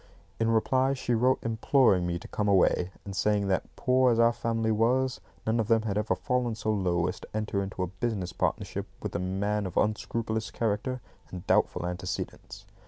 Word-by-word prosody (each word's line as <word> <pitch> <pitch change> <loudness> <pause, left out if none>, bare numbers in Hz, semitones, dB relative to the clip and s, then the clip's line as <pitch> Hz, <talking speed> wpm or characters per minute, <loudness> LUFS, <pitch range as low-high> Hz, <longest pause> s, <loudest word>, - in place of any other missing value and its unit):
In 115 0 +2
reply 130 +4 +2
she 125 -2 -1
wrote 125 +3 +3
imploring 110 -4 +3
me 85 0 -1
to 85 - -10
come 105 - -2
away, 95 -2 +3 0.2
and 100 -1 -6
saying 100 0 +1
that, 95 - 0
poor 130 0 +3
as 115 - +1
our 115 0 +5
family 115 -1 -1
was, 125 +4 +1 0.2
none 110 +1 +1
of 110 - 0
them 115 -1 +3
had 105 -3 -2
ever 105 +1 +1
fallen 125 -2 -1
so 110 0 -1
low 90 -4 +1
as 90 +1 -3
to - - -11
enter 105 -2 -1
into 95 -1 -3
a 90 +1 -5
business 100 -7 -1
partnership - - -2 0.2
with - - -4
a - - 0
man 100 +2 -1
of 90 - -7
unscrupulous 110 +1 -1
character 115 +3 -2 0.3
and 90 +1 -8
doubtful 90 - +2
antecedents. 95 +3 -5
110 Hz, 190 wpm, -28 LUFS, 95-115 Hz, 0.3 s, our